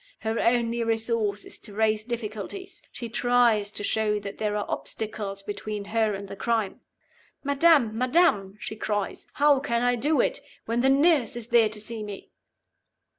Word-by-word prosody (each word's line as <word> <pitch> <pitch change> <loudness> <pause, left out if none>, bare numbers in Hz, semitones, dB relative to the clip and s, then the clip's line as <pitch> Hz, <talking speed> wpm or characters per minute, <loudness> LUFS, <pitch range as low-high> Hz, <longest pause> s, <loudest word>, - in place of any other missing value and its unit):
Her 220 +1 -1
only 235 0 +2
resource 225 -2 0
is - - -9
to 205 -3 -9
raise 215 0 +2
difficulties; 235 - -6
she 235 - -6
tries 235 -3 +3
to 205 - -5
show 210 0 +1
that 200 0 -7
there 210 -1 0
are 205 - -2
obstacles 205 -2 -4
between 205 0 -5
her 220 -1 +1
and 200 0 -7
the 195 - -7
crime. 220 -2 -1 0.6
'Madam! 280 -5 +4
madam!' 240 - +2
she 220 - -5
cries; 205 -2 -3
'how 290 -1 +4
can 235 -4 -1
I 245 0 +3
do 290 +6 +1
it, - - +2 0.3
when 230 +1 0
the 265 - +4
nurse 280 -4 +4
is 240 -1 -6
there 235 -3 +5
to 215 0 -2
see 220 +1 -4
me? 205 -2 -8
225 Hz, 170 wpm, -26 LUFS, 210-245 Hz, 0.6 s, there